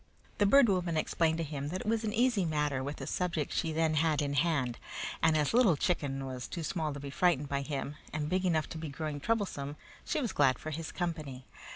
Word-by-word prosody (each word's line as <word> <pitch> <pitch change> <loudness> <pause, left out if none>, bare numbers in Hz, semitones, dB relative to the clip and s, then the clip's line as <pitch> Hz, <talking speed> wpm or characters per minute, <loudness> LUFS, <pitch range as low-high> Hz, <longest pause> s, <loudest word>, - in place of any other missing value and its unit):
The 205 - +5
Bird 275 +3 +7
Woman 180 -5 +1
explained 160 +1 +1
to 165 - -1
him 145 -2 -4
that 185 +3 -3
it - - -7
was 225 0 +1
an 215 - -1
easy 235 -2 +2
matter 150 -5 0
with 145 +2 -4
the - - -6
subject 170 -5 -1
she 165 - 0
then 160 0 +1
had 155 0 +2
in 145 -1 0
hand; 140 -5 +1 0.4
and 160 -1 +4
as 150 +5 +1
Little 225 - +5
Chicken 140 -5 -1
was 130 -1 -5
too 170 - -5
small 160 -2 -1
to 145 - -6
be 140 0 -6
frightened 145 -3 +2
by 140 0 0
him, 140 +1 -4
and 150 -1 -2
big 185 +4 0
enough 160 -4 +1
to 160 - -6
be 160 -1 -5
growing 150 +1 -4
troublesome, 150 -8 -1 0.3
she - - -1
was 240 -8 -2
glad 135 -3 +4
for 155 - -6
his 160 +1 -4
company. 155 -7 -4
155 Hz, 230 wpm, -31 LUFS, 145-180 Hz, 0.4 s, Bird